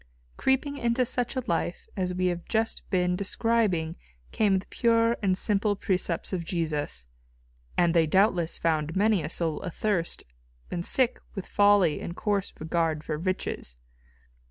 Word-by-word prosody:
Creeping 275 +2 +1
into 235 +2 +1
such 245 +2 -1
a 260 - -1
life 170 +1 -2
as 185 -2 -1
we 185 0 -1
have 175 -1 -1
just 225 0 -1
been 180 -2 +2
describing 200 -4 0 0.3
came 205 -3 +3
the 190 - -5
pure 230 0 +2
and 190 -3 +2
simple 205 0 +1
precepts 185 -2 -1
of 175 -2 -1
Jesus 155 - -2 0.7
and 170 -1 +4
they 165 -2 +4
doubtless 180 -1 +2
found 160 -1 0
many 205 -1 +3
a 150 - -4
soul 165 -2 -1
athirst 180 -1 -1 0.5
and 170 - -2
sick 255 +5 +2 0.2
with 195 - -4
folly 205 -7 +4
and 170 - -5
coarse 200 -2 -1
regard 160 -1 0
for 155 - -2
riches. 165 - -3
185 Hz, 150 wpm, -27 LUFS, 165-215 Hz, 0.7 s, and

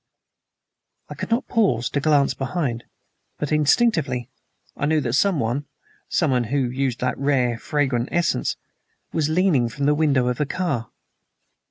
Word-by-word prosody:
I - - -6
could - - -6
not 235 +3 0
pause 195 - +1
to 145 - 0
glance 145 -1 +3
behind, 135 -4 -3 0.5
but 150 - -3
instinctively 150 - +2 0.4
I 145 - -1
knew 155 0 +3
that 120 -5 -2
someone 140 - +1 0.4
someone 130 -7 +1
who 130 +1 0
used 130 -2 -2
that 125 -1 -1
rare, 135 -4 +1
fragrant 135 -3 -1
essence 175 -1 0 0.6
was 155 -2 +1
leaning 160 -8 +2
from 140 +5 -3
the 150 - +4
window 145 -5 +2
of 125 -1 -1
the 150 - 0
car. 140 - -2
140 Hz, 145 wpm, -23 LUFS, 125-155 Hz, 0.6 s, the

